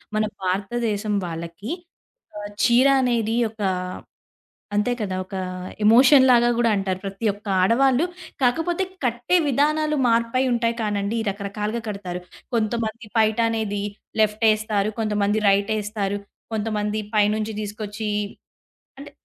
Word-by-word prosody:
మన 215 0 +2 0.2
భారతదేశం 205 +2 -1
వాళ్ళకి 170 - -6 0.7
ఆహ్, 205 0 -6
చీర 250 +3 +5
అనేది 230 -3 +1
ఒకా 210 -3 -2 1.1
అంతే 210 +4 +2
కదా! 190 -3 -2
ఒక 195 - -9 0.5
ఎమోషన్‌ 260 +4 +7
లాగా 240 0 +5
గూడా 235 -1 +3
అంటారు. 190 -1 -2
ప్రతి 195 +3 -5
ఒక్క 205 +1 -14
ఆడవాళ్ళు 260 - +3 0.4
కాకపోతే 325 +9 +1 0.2
కట్టే 240 +8 +1
విధానాలు 300 +3 +2
మార్పై 235 +2 +2
ఉంటాయి 230 0 0
కానండి. 205 +1 -1
ఈ - - -3
రకరకాలుగా 210 +3 -3
కడతారు. 185 -3 -5 0.3
కొంతమంది 225 0 -2
పైటనేది 220 -2 +1 0.4
లెఫ్ట్ 215 +1 +1
యేస్తారు. 215 -1 +1
కొంతమంది 210 -1 +1
రైట్ 200 +2 +2
యేస్తారు. 205 -1 -2 0.3
కొంతమంది 210 -1 -1 0.2
పైనుంచి 215 +1 +2
తీసుకొచ్చి 210 +1 -5 0.9
అంటే 285 - -10
215 Hz, 115 wpm, -23 LUFS, 205-235 Hz, 1.1 s, ఎమోషన్‌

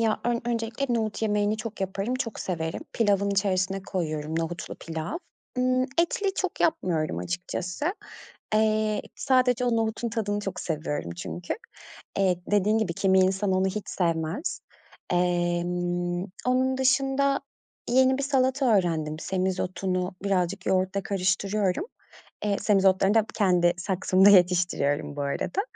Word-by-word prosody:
Ya, 220 -1 +1
ön 240 0 +1
öncelikle 235 +2 -1
nohut 220 -1 -2
yemeğini 210 0 +1
çok 220 -1 -7
yaparım, 195 +5 -2
çok 230 -4 -4
severim. 160 -3 -3
Pilavın 200 -3 +2
içerisine 195 -1 0
koyuyorum, 160 -4 -3
nohutlu 165 +1 -4
pilav. 160 - -5 0.4
Imm, 255 0 +2 0.2
etli 385 +3 0
çok 375 -2 -3
yapmıyorum 165 - +1
açıkçası. 180 - -3 0.6
Eee, 215 -1 +2
sadece 255 -2 +2
o 240 -2 +2
nohutun 225 +1 -1
tadını 210 -2 -2
çok 195 -3 -4
seviyorum 150 - -3
çünkü. 175 - -4 0.6
Eee, 190 -2 +3
dediğin 210 +2 +3
gibi 220 -6 0
kimi 190 +1 +3
insan 190 +1 +2
onu 185 +1 +2
hiç 200 +2 -3
sevmez. 165 - -1 0.5
Emm, 175 0 0 0.2
onun 260 +1 +2
dışında 270 +1 +2 0.5
yeni 260 +1 +4
bir - - -1
salata 265 -1 +2
öğrendim, 160 -4 0
semizotunu 185 0 -1
birazcık 190 -1 0
yoğurtla 190 +1 +1
karıştırıyorum. 195 - 0 0.6
Eee, 205 -1 +1
semizotlarını 195 -1 +3
da 220 -1 +4
kendi 180 -4 +3
saksımda 190 +1 +4
yetiştiriyorum 175 -7 +3
bu 145 - -2
arada. 140 - -1
195 Hz, 125 wpm, -26 LUFS, 180-225 Hz, 0.6 s, yeni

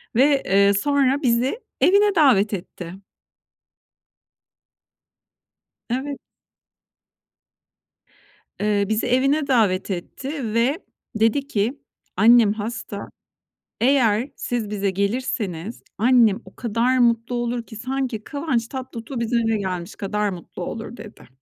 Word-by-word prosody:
ve, 275 +2 +4
eee, 200 +1 +4
sonra 280 +5 +2
bizi 250 - +1 0.2
evine 405 +1 +4
davet 220 -10 +4
etti. 180 -2 -6 3.0
Evet. 270 +3 -3 2.4
Eee, 205 -1 +1
bizi 220 0 0
evine 275 +4 +2
davet 210 -7 +2
etti 240 - -5
ve 245 +6 +2 0.4
dedi 225 +6 +2
ki 235 +2 -1 0.4
Annem 225 0 +6
hasta. 215 -1 -6 0.7
Eğer 245 -2 +3
siz 235 -4 -3
bize 200 -1 -1
gelirseniz 200 -1 -2 0.2
annem 230 -2 +4
o - - -15
kadar 235 +2 0
mutlu 235 0 +2
olur 240 0 -2
ki, 225 - -12
sanki 250 -1 -3
Kıvanç 275 -6 -2
Tatlıtuğ 255 -1 -6
bizim 235 0 +1
eve 220 - +2
gelmiş 185 -2 -4
kadar 210 +1 -1
mutlu 180 -1 -7
olur" 230 +5 -6
dedi. 215 -1 -12
230 Hz, 105 wpm, -22 LUFS, 205-260 Hz, 3.0 s, Annem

